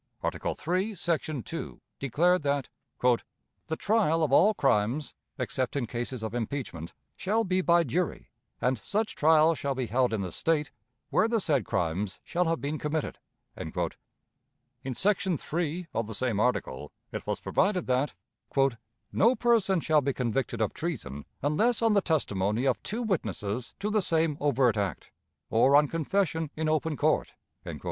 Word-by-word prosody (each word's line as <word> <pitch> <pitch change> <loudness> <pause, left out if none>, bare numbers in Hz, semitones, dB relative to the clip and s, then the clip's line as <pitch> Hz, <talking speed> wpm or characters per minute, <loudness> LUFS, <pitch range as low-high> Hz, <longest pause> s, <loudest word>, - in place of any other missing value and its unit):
Article - - -2
III, 190 +5 0
section 155 - -1
2, 165 - -6 0.2
declared 170 +7 +2
that 140 -2 0 0.3
"The 125 +5 -2
trial 195 -7 +2
of 150 - +1
all 210 +8 +6
crimes, 125 - +1 0.2
except 130 0 -2
in 135 -4 0
cases 120 +1 -4
of 110 0 -3
impeachment, 115 - -4 0.2
shall 220 +4 +1
be 185 -2 +1
by 170 -1 +4
jury; 165 +5 -2 0.3
and 125 -2 +1
such 215 - -1
trial 160 +1 +5
shall 140 -3 -2
be 130 -1 -1
held 125 +3 +1
in 110 -3 -1
the 90 -2 -4
State 150 - 0 0.4
where 220 - +4
the 230 0 +1
said 145 - +1
crimes 95 +2 -1
shall 180 +1 0
have 165 -3 0
been 145 +4 -3
committed." 150 0 -2 0.4
In 130 -2 -8
section 190 - +1
3, 170 +4 -2
of 115 -1 -1
the 110 - -4
same 120 -3 0
article, 75 - -1 0.2
it - - -6
was - - -1
provided 190 -3 +1
that 130 0 0 1.0
"No 235 +5 +4
person 225 -7 +3
shall 155 -1 +3
be 140 0 0
convicted 120 -1 -1
of 110 - +1
treason 115 - -4 0.2
unless 215 +12 +2
on 225 -1 +4
the 200 - +4
testimony 110 - 0
of 130 -3 +1
two 230 +3 -3
witnesses 115 - -2
to 210 +1 -1
the 215 -1 +3
same 165 -4 +1
overt 130 -6 +2
act, 100 -2 -3 0.4
or 130 +5 +5
on 150 +1 +6
confession 165 0 0
in 160 0 -1
open 155 -1 0
court." - - +1
150 Hz, 155 wpm, -28 LUFS, 120-175 Hz, 1.0 s, all